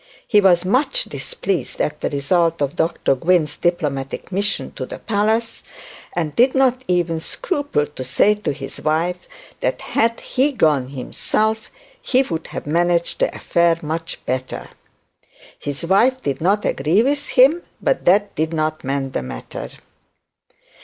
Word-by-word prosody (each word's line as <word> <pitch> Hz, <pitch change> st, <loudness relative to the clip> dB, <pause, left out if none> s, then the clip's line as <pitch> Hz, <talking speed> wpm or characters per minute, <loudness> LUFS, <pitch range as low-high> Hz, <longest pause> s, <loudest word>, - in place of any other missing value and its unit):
He 210 Hz, -, +5 dB
was 180 Hz, -2 st, +4 dB
much 285 Hz, -, +2 dB
displeased 200 Hz, -, -3 dB
at 150 Hz, -, -1 dB
the -, -, 0 dB
result 165 Hz, +4 st, +1 dB
of 145 Hz, +2 st, -1 dB
Dr 165 Hz, -4 st, +1 dB
Gwynne's 160 Hz, +2 st, +2 dB
diplomatic 150 Hz, -5 st, -2 dB
mission 200 Hz, +3 st, -1 dB
to -, -, -6 dB
the -, -, -7 dB
palace, 220 Hz, +2 st, 0 dB, 0.5 s
and 160 Hz, -4 st, -2 dB
did 255 Hz, +3 st, +4 dB
not 260 Hz, -1 st, +3 dB
even 175 Hz, -2 st, +1 dB
scruple 285 Hz, -, -1 dB
to 145 Hz, -3 st, -8 dB
say 195 Hz, +11 st, +3 dB
to 210 Hz, -6 st, -3 dB
his 135 Hz, -1 st, -7 dB
wife 170 Hz, +4 st, -1 dB, 0.3 s
that -, -, -1 dB
had 230 Hz, +1 st, 0 dB
he 275 Hz, +3 st, +1 dB
gone 150 Hz, -, +2 dB
himself 215 Hz, -, -2 dB, 0.3 s
he 260 Hz, +1 st, +2 dB
would 165 Hz, -9 st, -4 dB
have -, -, -6 dB
managed 170 Hz, +2 st, +1 dB
the -, -, +2 dB
affair 170 Hz, -1 st, +2 dB
much 165 Hz, +2 st, -4 dB
better. 130 Hz, 0 st, -3 dB, 0.9 s
His 145 Hz, +3 st, -4 dB
wife 235 Hz, +9 st, +3 dB
did 140 Hz, 0 st, -2 dB
not 200 Hz, +5 st, +2 dB
agree 160 Hz, +10 st, +2 dB
with 285 Hz, +2 st, 0 dB
him, 275 Hz, +7 st, +5 dB, 0.2 s
but -, -, 0 dB
that 200 Hz, +3 st, +4 dB
did 160 Hz, +2 st, -1 dB
not 155 Hz, 0 st, -1 dB
mend 135 Hz, 0 st, -2 dB
the -, -, -1 dB
matter. -, -, -7 dB
175 Hz, 150 wpm, -20 LUFS, 150-220 Hz, 0.9 s, He